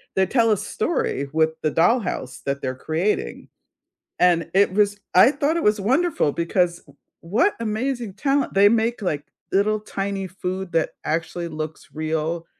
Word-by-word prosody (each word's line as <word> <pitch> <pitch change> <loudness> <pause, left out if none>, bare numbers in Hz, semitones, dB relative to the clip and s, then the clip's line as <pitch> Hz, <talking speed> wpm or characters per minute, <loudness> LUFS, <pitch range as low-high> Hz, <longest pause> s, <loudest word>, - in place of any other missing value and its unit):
they 190 - +3
tell 230 +2 +2
a 210 - +3
story 160 - -2
with 160 0 +2
the 155 - 0
dollhouse 175 - 0
that 140 0 -2
they're 130 -1 -3
creating. 160 +9 -2 0.7
And 170 -2 +3
it 195 0 +4
was 205 0 +2 0.2
I 190 +9 +7
thought 295 +3 0
it - - -2
was 210 0 +2
wonderful 265 - +1
because, 170 +1 0
w - - -21 0.2
what 215 - +1
amazing 230 -1 -2
talent! 275 +4 0
They 200 +1 +7
make 230 0 0
like 150 -6 -2 0.3
little 210 +2 +2
tiny 195 -2 -3
food 185 0 -5
that 165 -1 +1
actually 165 +2 -2
looks 155 -1 -6
real. 160 +2 -2
190 Hz, 155 wpm, -23 LUFS, 165-220 Hz, 0.7 s, I